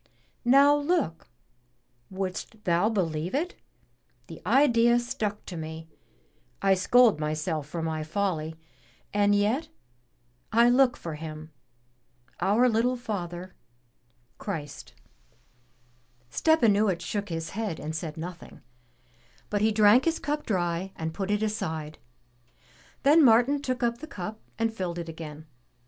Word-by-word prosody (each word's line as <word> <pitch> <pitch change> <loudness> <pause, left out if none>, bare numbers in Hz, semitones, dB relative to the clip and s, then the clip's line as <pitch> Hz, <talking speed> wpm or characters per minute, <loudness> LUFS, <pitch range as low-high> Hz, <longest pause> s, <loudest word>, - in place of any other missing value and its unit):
Now 275 +4 +6
look! 290 - -1 0.8
wouldst 190 +3 -5
thou 175 +3 +2
believe 175 -3 -1
it? 340 +6 -1 0.7
the - - -11
idea 240 -4 +4
stuck 215 -3 -3
to 180 - -7
me 160 0 -7 0.4
— - - -39 0.3
I 195 0 +5
scold 215 +1 +4
myself 155 0 -2
for 165 0 -4
my 160 -1 -2
folly, 160 -2 -2 0.6
and 205 0 +3
yet 230 +11 +1 0.8
I 235 +2 +5
look 250 0 +4
for 165 - -6
Him, 155 0 -8 0.9
our 210 +7 +3
little 240 +2 +2
Father, 185 -6 -5 0.9
Christ!" 150 -8 -6 1.4
Stepanuich 215 - +3
shook 200 +5 -3
his 165 -1 -4
head 210 -5 -3
and 155 +1 -5
said 155 -1 -5
nothing, 175 +2 -8 0.9
but 205 -1 0
he 220 +1 +3
drank 215 +4 +5
his 330 0 +1
cup 295 0 -3
dry 180 -1 -1
and 160 0 -4
put 195 +2 -4
it 210 +1 +1
aside. 160 -8 -3 1.0
Then 300 +3 +6
Martin 250 +4 +5
took 255 -3 -2
up 235 0 0
the 310 - -8
cup 210 - -6 0.2
and 225 0 0
filled 180 -5 -4
it 170 -1 -5
again. 155 -1 -8
200 Hz, 130 wpm, -27 LUFS, 165-235 Hz, 1.4 s, Now